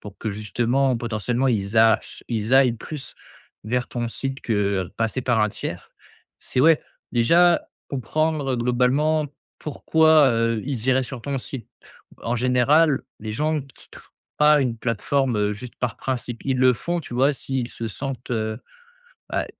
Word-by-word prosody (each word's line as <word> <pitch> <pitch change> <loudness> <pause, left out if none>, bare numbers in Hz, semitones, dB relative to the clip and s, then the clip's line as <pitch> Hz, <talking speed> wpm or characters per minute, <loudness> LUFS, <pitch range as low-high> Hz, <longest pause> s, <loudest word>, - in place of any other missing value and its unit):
pour 105 -1 -10
que, 110 - -4
justement, 120 +5 0
potentiellement, 120 +3 -1
ils 105 -3 -1
a 110 0 +6
che - - -13
ils 115 +1 0
aillent 135 -2 +6
plus 135 +5 -8 0.5
vers 120 +3 -1
ton 120 -1 -3
site 135 +3 -4
que, 115 - -2 0.3
heu, - - -12
passer 115 +3 -1
par 120 -3 +2
un 105 - +3
tiers. - - -6 0.5
C'est 125 - -2
ouais, 160 +2 +5 0.3
déjà 170 +9 +4 0.2
comprendre, 150 +1 -1
heu, 125 - 0
globalement, 130 +6 +2 0.3
pourquoi, 155 0 +4
heu, 115 -1 0
ils 130 -4 -3
iraient 130 0 +3
sur 130 -1 -7
ton 140 +3 -3
site? 125 -1 -7 0.6
En 120 +1 -1
général, 130 +5 +3 0.2
les 110 0 -5
gens 150 +5 0
quittent 135 -1 -15 0.4
pas 150 -1 +5
une 120 -3 -1
plateforme, 125 +2 0
heu, 105 0 +1
juste 120 +4 -8
par 120 -4 -2
principe. 125 -3 -4
Ils 135 -2 0
le 130 0 +5
font, 170 +8 -2
tu 145 - -10
vois, 135 +4 +3
s'ils 130 -3 -3
se 115 -2 -5
sentent, 130 +2 -6
heu 110 -2 -2 0.7
bah, - - -1
125 Hz, 165 wpm, -23 LUFS, 115-140 Hz, 0.7 s, a